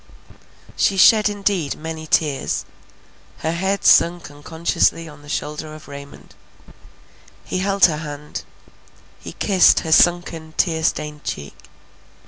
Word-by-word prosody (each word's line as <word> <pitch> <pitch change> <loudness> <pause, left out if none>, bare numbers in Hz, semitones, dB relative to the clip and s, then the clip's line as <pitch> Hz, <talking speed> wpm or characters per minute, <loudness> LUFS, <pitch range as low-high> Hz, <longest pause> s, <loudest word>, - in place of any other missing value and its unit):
She 195 - +1
shed 215 +3 +6
indeed 200 -7 -1
many 160 0 -7
tears; 150 -3 0 0.8
her 160 - -1
head 190 +3 -2
sunk 170 -3 +4
unconsciously 160 +2 -1
on 150 -1 -13
the 145 - -15
shoulder 150 +1 -5
of 155 - -14
Raymond; 140 0 -12 1.1
he 185 - -3
held 195 +1 +3
her 155 -4 +1
hand: 150 -1 -7 0.8
he - - -9
kissed 190 -3 +4
her 160 - -5
sunken 165 -2 +2
tear 160 -3 0
stained 150 -1 -2
cheek. 70 -1 -6
160 Hz, 120 wpm, -20 LUFS, 150-180 Hz, 1.1 s, shed